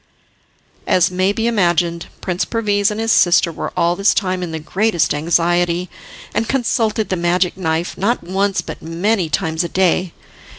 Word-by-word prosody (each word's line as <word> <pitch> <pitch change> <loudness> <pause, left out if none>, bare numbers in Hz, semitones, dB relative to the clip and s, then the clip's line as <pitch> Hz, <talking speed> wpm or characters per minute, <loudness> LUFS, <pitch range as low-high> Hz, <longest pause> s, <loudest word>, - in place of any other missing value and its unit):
As 180 0 +3
may 185 +2 +1
be 225 +2 -2
imagined, 175 -6 +1
Prince 180 0 -1
Perviz 205 -3 0
and 210 0 -4
his 225 0 0
sister 175 -3 +4
were - - -5
all 170 +1 +2
this 200 +2 +2
time 185 -2 -1
in 175 -2 -4
the 160 - -3
greatest 185 +3 0
anxiety, 175 +3 +1 0.4
and 225 - -1
consulted 225 -4 0
the 185 - 0
magic 175 +1 +1
knife, 165 -2 -2
not 230 +6 0
once 195 +3 0
but - - -8
many 175 +2 -1
times 160 +2 -1
a 170 - -4
day. 185 -1 +1
180 Hz, 165 wpm, -18 LUFS, 170-205 Hz, 0.4 s, sister